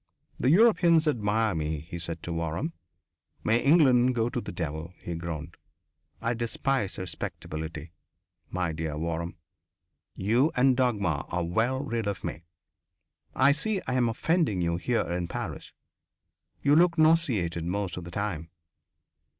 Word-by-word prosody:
"The 130 - +2
Europeans 170 -4 +5
admire 110 -4 +1
me," 80 -2 -2
he 85 +2 -7
said 85 -1 -5
to 85 - -4
Waram. 85 - -2 0.7
"May 115 +2 +3
England 130 -5 +5
go 115 0 +1
to 120 - -3
the - - -6
devil." 80 +1 -5
He 85 - -5
groaned. 85 -1 -6 0.6
"I 115 - 0
despise 120 -1 -1
respectability, 80 -3 -6 0.6
my 90 -2 -1
dear 80 -1 -3
Waram. 85 +1 -3 0.8
You 120 +10 +2
and 130 +1 +4
Dagmar 100 - 0
are 90 0 -1
well 115 +10 0
rid 115 -6 -2
of 100 -3 -3
me. 80 - -5 0.9
I 140 - +5
see 195 +8 0
I'm 125 -2 +1
offending 155 - +1
you 85 -1 0
here 120 +6 0
in 90 0 -2
Paris - - -5 0.9
you 145 +1 +5
look 170 +1 +4
nauseated 130 - +3
most 95 -1 -2
of 90 - -6
the 85 - -8
time. 85 -4 -3
100 Hz, 140 wpm, -28 LUFS, 85-130 Hz, 0.9 s, Europeans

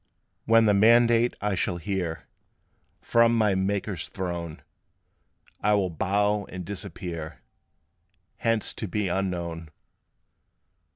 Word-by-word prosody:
"When 115 0 +5
the 105 - +4
mandate 115 +3 +4
I 105 0 0
shall 90 -1 -1
hear 85 -2 -3 0.8
From 115 0 +4
my 105 -3 +3
Maker's 95 -2 -2
throne, 85 -4 -5 1.0
I 105 0 +3
will 95 -3 0
bow 100 +4 0
and 90 -1 -8
disappear, 85 -4 -7 0.9
Hence 115 -2 0
to 110 - -5
be 100 +1 -1
unknown." 85 -3 -3
100 Hz, 105 wpm, -26 LUFS, 85-105 Hz, 1.0 s, When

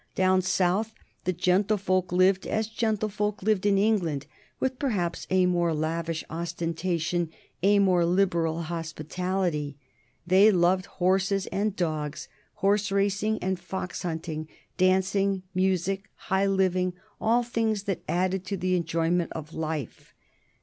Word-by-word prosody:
Down 185 0 +3
South 190 +4 +1 0.3
the 185 - +2
gentlefolk 185 0 +1
lived 185 +1 +3
as 220 0 0
gentlefolk 210 -2 -1
lived 205 -1 +2
in 200 -1 +4
England, 180 -9 +1 0.3
with 260 -1 -1
perhaps 195 -11 -1
a 185 -1 +4
more 175 -2 +1
lavish 165 +1 -2
ostentation, 170 0 -2 0.3
a 200 +3 +4
more 185 -3 +4
liberal 170 -2 +1
hospitality. 165 -1 -3 0.5
They 190 +4 +6
loved 185 0 +2
horses 190 +2 +1
and 205 0 0
dogs, 155 -5 -2 0.3
horse 200 +1 +1
racing 200 +2 +1
and 190 -1 -1
fox 190 -1 -5
hunting, 160 -2 -4 0.3
dancing, 190 +1 +2
music, 190 +1 0
high 190 +1 0
living, 185 -2 +1 0.3
all 235 +2 +3
things 225 -3 -1
that 195 -3 -2
added 185 +1 0
to 195 +1 -3
the 185 0 +1
enjoyment 165 0 0
of 160 0 -7
life. 155 -5 -5
185 Hz, 125 wpm, -27 LUFS, 170-195 Hz, 0.5 s, They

